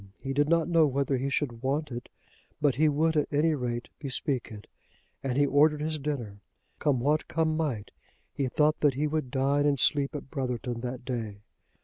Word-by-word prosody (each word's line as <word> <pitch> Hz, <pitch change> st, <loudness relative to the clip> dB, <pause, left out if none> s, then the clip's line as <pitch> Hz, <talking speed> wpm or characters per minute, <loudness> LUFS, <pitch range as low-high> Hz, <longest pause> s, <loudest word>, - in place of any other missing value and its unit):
He 135 Hz, 0 st, -4 dB
did 145 Hz, +2 st, +2 dB
not 165 Hz, -1 st, +3 dB
know 165 Hz, -3 st, +4 dB
whether 140 Hz, 0 st, 0 dB
he 135 Hz, +2 st, -1 dB
should 130 Hz, -5 st, -2 dB
want 140 Hz, +2 st, -1 dB
it, 120 Hz, 0 st, -6 dB, 0.5 s
but 145 Hz, -3 st, +3 dB
he 155 Hz, +5 st, +3 dB
would 160 Hz, +2 st, +1 dB
at 150 Hz, -, +1 dB
any 155 Hz, +2 st, +3 dB
rate 120 Hz, -4 st, -3 dB
bespeak 135 Hz, -3 st, -2 dB
it. 105 Hz, -1 st, -9 dB, 0.6 s
And 135 Hz, -1 st, -2 dB
he 145 Hz, -, +5 dB
ordered 150 Hz, +2 st, +4 dB
his 155 Hz, 0 st, -1 dB
dinner. 125 Hz, -9 st, -4 dB, 0.4 s
Come 140 Hz, -4 st, +2 dB
what 150 Hz, +5 st, +1 dB
come 160 Hz, -1 st, 0 dB
might, 135 Hz, -10 st, -2 dB, 0.4 s
he 135 Hz, -2 st, -1 dB
thought 150 Hz, +4 st, +2 dB
that 145 Hz, -4 st, +3 dB
he 145 Hz, +3 st, 0 dB
would 150 Hz, -3 st, -1 dB
dine 140 Hz, +2 st, +2 dB
and 140 Hz, -2 st, +1 dB
sleep 140 Hz, +1 st, +2 dB
at 140 Hz, -2 st, -7 dB
Brotherton 125 Hz, -4 st, -3 dB
that 125 Hz, 0 st, -5 dB
day. 110 Hz, -5 st, -4 dB
140 Hz, 195 wpm, -28 LUFS, 125-150 Hz, 0.6 s, he